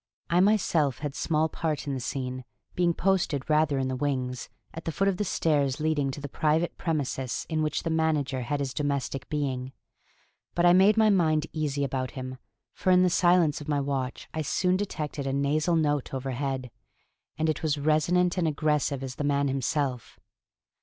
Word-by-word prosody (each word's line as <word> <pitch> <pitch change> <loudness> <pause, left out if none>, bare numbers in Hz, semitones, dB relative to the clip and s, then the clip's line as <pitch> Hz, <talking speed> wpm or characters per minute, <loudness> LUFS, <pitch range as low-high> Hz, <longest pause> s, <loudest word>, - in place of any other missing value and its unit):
I 175 - +4
myself 180 - +2
had 145 -2 -4
small 160 +1 +1
part 155 -1 -3
in 140 - -2
the 130 - -2
scene, 130 0 -4 0.3
being 175 -1 +2
posted 170 -6 0
rather 150 -2 +2
in 130 -1 0
the 130 - -2
wings, 130 -2 -2 0.2
at 165 - -8
the 165 - -1
foot 195 +5 0
of 195 -2 +1
the 210 - 0
stairs 145 -7 +1
leading 150 -3 +1
to 135 - -5
the 145 - -5
private 155 +4 0
premises 135 -5 -2
in 160 -1 0
which 155 -1 -1
the 165 - -1
manager 155 -5 0
had 140 +4 -2
his 135 -2 -3
domestic 140 -2 -2
being. 135 -3 -2 0.8
But 175 - +3
I 175 - +7
made 195 +4 +5
my 220 -1 +5
mind 160 -5 +2
easy 145 -3 -1
about 130 -1 -2
him, 130 0 -6 0.3
for - - -2
in 180 0 +6
the 180 - +3
silence 175 -4 +3
of 150 - -9
my 145 -1 +1
watch 135 -2 -3
I 160 - -2
soon 180 +5 +1
detected 155 -7 -3
a 135 - -1
nasal 150 +4 +1
note 145 -4 0
overhead, 130 -1 -3 0.7
and 160 +1 0
it 155 - -1
was 150 -2 0
resonant 170 +5 +2
and 170 - +1
aggressive 150 -3 0
as 130 -1 -6
the - - -2
man 140 -1 +1
himself. 135 -2 -2
150 Hz, 185 wpm, -27 LUFS, 135-160 Hz, 0.8 s, I